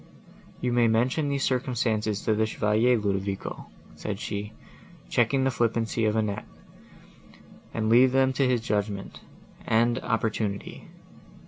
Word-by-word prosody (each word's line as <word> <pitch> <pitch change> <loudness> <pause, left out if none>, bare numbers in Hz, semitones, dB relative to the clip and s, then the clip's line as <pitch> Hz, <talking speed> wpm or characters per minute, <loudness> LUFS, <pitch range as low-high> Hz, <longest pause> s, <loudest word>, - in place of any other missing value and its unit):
"You 125 -1 0
may 120 -1 +4
mention 125 +7 +1
these 140 -1 -1
circumstances 115 -5 0
to 110 - +2
the 110 +1 +1
Chevalier, 110 +3 +2
Ludovico," 100 -2 -3 0.3
said - - -5
she, 105 +1 -4 0.6
checking 130 +3 +2
the 135 - +2
flippancy 115 -1 0
of 105 0 +1
Annette, 105 -2 -1 1.2
"and 110 -1 -2
leave 125 +3 +6
them 130 0 +3
to 135 0 +2
his 125 -2 +1
judgment 105 -3 -3 0.5
and 120 +2 +2
opportunity. 110 -3 -2
115 Hz, 125 wpm, -26 LUFS, 105-125 Hz, 1.2 s, leave